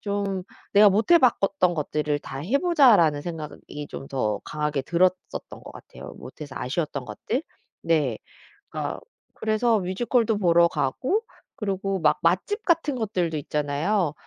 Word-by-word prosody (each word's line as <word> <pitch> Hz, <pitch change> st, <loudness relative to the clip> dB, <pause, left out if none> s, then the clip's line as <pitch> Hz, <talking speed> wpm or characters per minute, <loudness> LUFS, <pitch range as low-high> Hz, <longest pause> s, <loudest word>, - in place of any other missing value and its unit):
좀 200 Hz, -2 st, -2 dB, 0.3 s
'내가 205 Hz, 0 st, +8 dB
못해봤 245 Hz, -, +4 dB
것 195 Hz, 0 st, -1 dB
던 180 Hz, -1 st, +4 dB
것들을 150 Hz, -1 st, -1 dB
다 135 Hz, -, -8 dB
해보자.'라는 225 Hz, -, +4 dB
생각이 150 Hz, -3 st, -7 dB
좀 135 Hz, -, -8 dB
더 105 Hz, -6 st, -1 dB
강하게 150 Hz, -2 st, -2 dB
들었었던 180 Hz, +5 st, +2 dB, 0.4 s
것 -, -, -10 dB
같아요 -, -, -11 dB
못해서 140 Hz, +1 st, -10 dB
아쉬웠던 140 Hz, 0 st, -3 dB
것들. 125 Hz, -, -3 dB, 0.4 s
네. 150 Hz, -8 st, +2 dB, 0.5 s
그러니까 -, -, -4 dB, 0.3 s
그래서 220 Hz, +1 st, +1 dB
뮤지컬도 220 Hz, +4 st, 0 dB
보러 170 Hz, -3 st, +4 dB
가고 180 Hz, -, -1 dB, 0.3 s
그리고 195 Hz, -1 st, -2 dB
막 150 Hz, -2 st, +2 dB
맛집 185 Hz, -, +1 dB
같은 330 Hz, -4 st, +2 dB
것들도 185 Hz, -9 st, -1 dB
있잖아요. 150 Hz, +5 st, -1 dB
180 Hz, 305 characters per minute, -25 LUFS, 150-215 Hz, 0.5 s, 내가